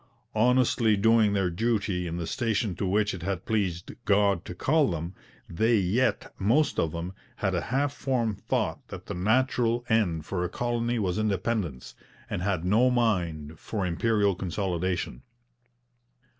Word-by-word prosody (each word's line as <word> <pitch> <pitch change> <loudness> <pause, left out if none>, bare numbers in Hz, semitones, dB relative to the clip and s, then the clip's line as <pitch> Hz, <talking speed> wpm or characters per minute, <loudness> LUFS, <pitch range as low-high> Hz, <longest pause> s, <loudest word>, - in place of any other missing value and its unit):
Honestly 115 -1 +3
doing 110 0 +4
their 95 -3 +1
duty 100 -3 0
in 85 +1 -4
the 85 - -3
station 110 -2 -1
to 100 - -2
which 105 +2 +1
it 95 - -6
had 95 +1 -3
pleased 95 -6 -1
God 100 -3 +2
to 90 - -7
call 150 - +2
them, 85 +1 -4 0.3
they 110 +8 +2
yet, 105 +7 0
most 120 +11 +2
of 80 - +1
them, 85 +3 -5 0.2
had 95 -2 -1
a 85 - 0
half 140 +3 +1
formed 120 -8 -1
thought - - -1
that - - -9
the - - -5
natural 120 +4 +1
end 90 -9 +1
for 90 -1 -2
a 90 - -2
colony 120 +1 -1
was 95 -2 -1
independence, 100 - -2 0.4
and - - -2
had 90 -3 -1
no 110 +7 +4
mind 85 -11 0
for 105 -4 -3
Imperial 100 +3 +2
consolidation. 90 - -2
100 Hz, 155 wpm, -27 LUFS, 90-115 Hz, 0.4 s, doing